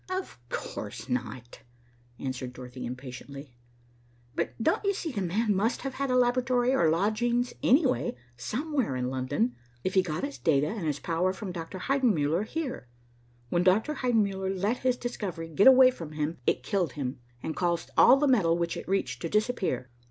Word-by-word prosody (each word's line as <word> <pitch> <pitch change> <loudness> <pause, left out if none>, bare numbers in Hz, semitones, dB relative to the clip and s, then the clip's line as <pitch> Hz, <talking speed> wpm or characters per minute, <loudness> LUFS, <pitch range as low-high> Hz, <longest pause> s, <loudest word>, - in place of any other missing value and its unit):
"Of 370 - -4
course - - -5
not," 120 0 -4 0.6
answered 130 -1 -4
Dorothy 125 0 -7
impatiently. 130 +2 -8 0.8
"But - - -2
don't 320 - +1
you 400 -1 +1
see 330 -5 -3
the 210 -6 -3
man 205 +4 +1
must 220 +6 0
have 270 -1 -4
had 275 0 -2
a 255 - +2
laboratory, 250 0 +2
or 170 -11 +4
lodgings, 225 +8 +1
anyway, 265 - +3 0.2
somewhere 255 - -2
in 125 0 -2
London, 130 -2 -1 0.3
if 185 - -1
he 190 - +5
got 160 -3 -4
his 280 0 -4
data 145 -3 +3
and 205 -7 -3
his 145 -2 -1
power 175 +2 0
from 190 -1 -6
Dr. 170 +1 -6
Heidenmuller 200 - +1
here. 295 - -4 0.6
When 175 - +2
Dr. 195 +11 +3
Heidenmuller 210 -8 0
let 200 +5 0
his 255 -1 +1
discovery 190 -10 -4
get 175 - +4
away 260 -1 +9
from 165 -10 -8
him, 150 0 -2
it - - +2
killed 175 +2 0
him, 130 -3 -4 0.2
and 160 - -3
caused 170 -2 -1
all 260 - +8
the 290 +1 +2
metal 180 -11 +3
which 170 0 -1
it - - -7
reached 130 -10 -1
to 165 - -3
disappear. 210 - 0
190 Hz, 175 wpm, -28 LUFS, -, 0.8 s, away